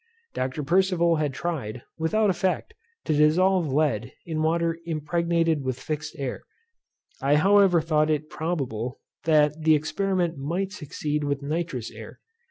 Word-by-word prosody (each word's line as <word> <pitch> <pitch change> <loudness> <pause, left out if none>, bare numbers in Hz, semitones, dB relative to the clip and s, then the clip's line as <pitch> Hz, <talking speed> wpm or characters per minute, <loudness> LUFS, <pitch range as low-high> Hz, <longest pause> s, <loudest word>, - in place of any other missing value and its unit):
Dr. 130 +3 -2
Percival 170 0 +3
had 150 -2 0
tried, 130 -7 -4 0.2
without 205 +6 +2
effect, 185 +1 -1 0.3
to 155 - +1
dissolve 165 +2 +3
lead 130 -5 +1
in 160 -2 -2
water 165 +1 +1
impregnated 165 0 0
with 130 -1 -3
fixed 150 0 -4
air. 135 -3 -4 0.8
I 140 +2 +3
however 195 +1 +5
thought 155 -1 +2
it 155 0 0
probable, 130 -9 -3 0.3
that 155 -1 +3
the 155 0 +5
experiment 175 +1 -1
might 175 +8 -2
succeed 150 -4 -3
with 140 -1 -2
nitrous 150 -5 -3
air. - - -11
155 Hz, 135 wpm, -25 LUFS, 145-170 Hz, 0.8 s, however